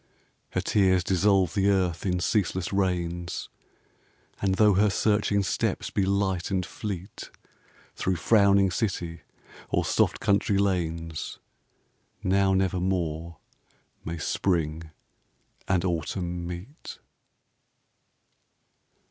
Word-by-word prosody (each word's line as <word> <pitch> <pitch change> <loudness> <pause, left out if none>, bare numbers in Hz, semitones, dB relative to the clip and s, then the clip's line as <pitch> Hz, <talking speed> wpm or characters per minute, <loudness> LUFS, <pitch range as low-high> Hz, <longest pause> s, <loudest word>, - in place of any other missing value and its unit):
Her - - +1
tears 95 -3 +3
dissolve 95 -1 +2
the 100 -1 +2
earth 95 -2 +1
in 90 -1 0
ceaseless 95 -1 0
rains 90 -3 -1 0.9
And 95 -1 +1
though 105 0 +5
her 105 +3 +4
searching 105 0 +1
steps 90 - -1
be 95 -1 0
light 95 -2 0
and 95 -2 0
fleet 100 -1 -6 0.7
Through 95 - 0
frowning 100 +1 +4
city 90 -6 -2 0.5
or - - +1
soft - - +1
country 100 0 +2
lanes, 85 -5 -2 0.9
Now 95 0 +3
never 95 -1 +1
more 85 -3 -2 0.7
may 85 +1 -4
Spring 80 -1 -1 0.8
and 90 -1 +1
Autumn 85 0 -2
meet. 90 - -8
95 Hz, 100 wpm, -27 LUFS, 85-100 Hz, 0.9 s, though